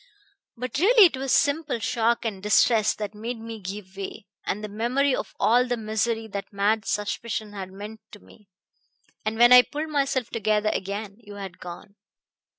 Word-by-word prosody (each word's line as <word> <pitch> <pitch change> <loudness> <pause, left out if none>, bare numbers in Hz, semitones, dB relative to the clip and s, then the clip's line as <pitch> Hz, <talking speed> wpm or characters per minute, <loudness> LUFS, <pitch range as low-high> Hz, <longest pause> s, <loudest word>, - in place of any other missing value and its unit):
"But 255 +3 -3
really 430 +4 +7
it 330 - +2
was 265 0 -3
simple 290 -2 +2
shock 230 +1 0
and 200 -4 -3
distress 210 +1 +3
that 210 -1 -5
made 230 +3 -5
me 225 0 -7
give 190 0 -7
way, 195 0 -7 0.2
and 210 +2 -3
the - - -3
memory 250 +6 +1
of - - -6
all 245 +3 +4
the 245 0 -1
misery 220 +1 -1
that 200 -1 -6
mad 205 +1 +1
suspicion 210 +1 -3
had 190 -2 -7
meant 210 +3 -9
to 210 - -10
me. 205 -1 -20 0.7
And 220 +1 -2
when 240 +1 +7
I 250 - +11
pulled 300 +5 -5
myself 275 -5 0
together 215 -1 +1
again 200 +1 -4
you 205 -3 -12
had 195 -3 -8
gone." 180 +3 -10
220 Hz, 175 wpm, -25 LUFS, 205-245 Hz, 0.7 s, I